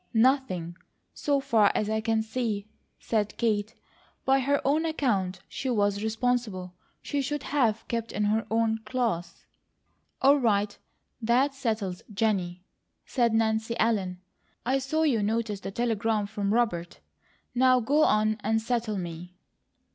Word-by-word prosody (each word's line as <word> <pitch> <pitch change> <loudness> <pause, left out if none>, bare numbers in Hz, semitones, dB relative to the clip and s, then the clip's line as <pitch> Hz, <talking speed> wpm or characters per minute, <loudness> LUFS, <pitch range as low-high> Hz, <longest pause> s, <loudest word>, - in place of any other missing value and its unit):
"Nothing, 220 -9 +2 0.4
so 285 -1 +1
far 230 -7 +3
as 215 - 0
I 220 0 0
can 225 0 +1
see," 220 -3 -2 0.3
said 210 -2 -1
Kate. 215 -2 0 0.5
"By 270 0 +4
her 280 +2 +2
own 295 +4 +3
account 205 - 0
she 265 - -4
was 205 -3 +1
responsible. 220 -5 -1 0.3
She 285 -1 -1
should 290 +1 -3
have 240 -7 0
kept 230 -1 -3
in 210 - -1
her 215 +2 +1
own 225 0 +1
class." 225 -7 -3 0.7
"All 280 +2 +5
right. 205 -4 +1 0.5
That 250 +5 +2
settles 215 -9 -2
Jennie!" 190 -4 -1 0.4
said 235 -3 +1
Nancy 220 +1 +1
Ellen. 195 -5 +1 0.5
"I 265 +3 +2
saw 310 +4 0
you 260 -9 +2
notice 215 -1 -1
the 195 - -6
telegram 225 -1 0
from 200 -1 -2
Robert 210 -7 0 0.5
now 255 0 +5
go 280 +6 +2
on 215 -2 +3
and 220 +2 +1
settle 230 -2 -1
me!" 175 0 -6
225 Hz, 140 wpm, -27 LUFS, 205-250 Hz, 0.7 s, All